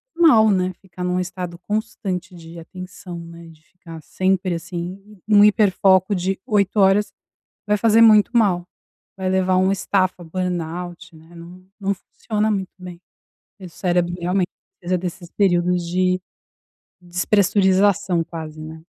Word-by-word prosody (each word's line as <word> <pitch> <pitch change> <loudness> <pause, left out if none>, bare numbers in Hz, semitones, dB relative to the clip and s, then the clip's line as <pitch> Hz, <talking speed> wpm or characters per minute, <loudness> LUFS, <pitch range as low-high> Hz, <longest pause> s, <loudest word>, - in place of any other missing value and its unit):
mal, 290 -11 +5
né, 185 -1 +1
ficar 180 -2 -9
num 180 0 0
estado 180 -1 -5
constante 190 -2 -4
de 165 0 -12
atenção, 180 +1 -9
né, 170 0 -11
de 160 -1 -18
ficar 165 -3 -12
sempre, 185 +2 -1
assim, 180 +4 -7
num 205 -1 +6
hiperfoco 200 -2 +4
de 190 +1 -2
8 210 -4 +1
horas 195 +1 +3 0.6
vai 210 0 +2
fazer 225 +1 +4
muito 215 -2 +6
mal, 190 -7 +2 0.5
vai 190 -1 -2
levar 185 0 +1
a - - +3
um 190 +1 +3
estafa, 185 -2 0
burnout, 175 0 -5
né, 160 +2 -18
não 175 +2 -13
não 200 0 0
funciona 215 +3 -3
muito 195 -3 -3
bem, 180 -1 -10 0.6
e 185 - -8
o - - -11
cérebro 175 0 -1
realmente 180 +1 0 0.3
precisa 180 +1 -1
desses 175 -1 -7
períodos 180 -2 +1
de 185 +1 0 0.8
despressurização 190 0 +2
quase, 155 -2 -8
né. 160 +1 -9
185 Hz, 140 wpm, -21 LUFS, 175-195 Hz, 0.8 s, num